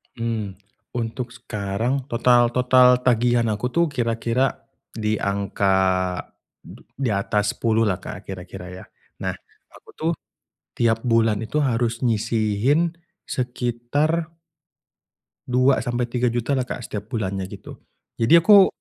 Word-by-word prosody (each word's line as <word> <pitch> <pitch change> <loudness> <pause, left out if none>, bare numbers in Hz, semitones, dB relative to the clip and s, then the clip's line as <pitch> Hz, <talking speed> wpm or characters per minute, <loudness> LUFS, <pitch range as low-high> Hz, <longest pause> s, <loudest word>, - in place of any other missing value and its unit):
Mmm, 110 -4 -3 0.4
untuk 120 +1 -3
sekarang 115 +4 -3
total 120 0 +4
total 125 0 +5 0.2
tagihan 120 -1 +3
aku 105 +4 -1
tuh 170 0 +4
kira-kira 120 +1 0 0.3
di 110 -1 -1
angka 100 -1 0 0.9
du - - -13
di 135 -4 -1
atas 105 +1 0
Rp10.000.000 115 -1 +1
lah, 95 -2 0
Kak, 90 +1 -8
kira-kira 90 -1 -8
ya. 95 - -10 0.4
Nah, - - -2 0.4
aku - - -18
tuh 160 +1 -1 0.7
tiap 115 -1 +2
bulan 115 -3 +2
itu 130 +7 -2
harus 115 -3 0
nyisihin 115 +8 +1 0.3
sekitar 125 +7 -1 1.2
Rp2.000.000-Rp3.000.000 125 -1 +1
lah, 130 -2 0
Kak, 125 - -5
setiap 105 0 -6
bulannya 95 -5 -3
gitu. 100 -1 -11 0.4
Jadi 115 +9 +5
aku 200 -1 +8
115 Hz, 115 wpm, -23 LUFS, 105-125 Hz, 1.2 s, aku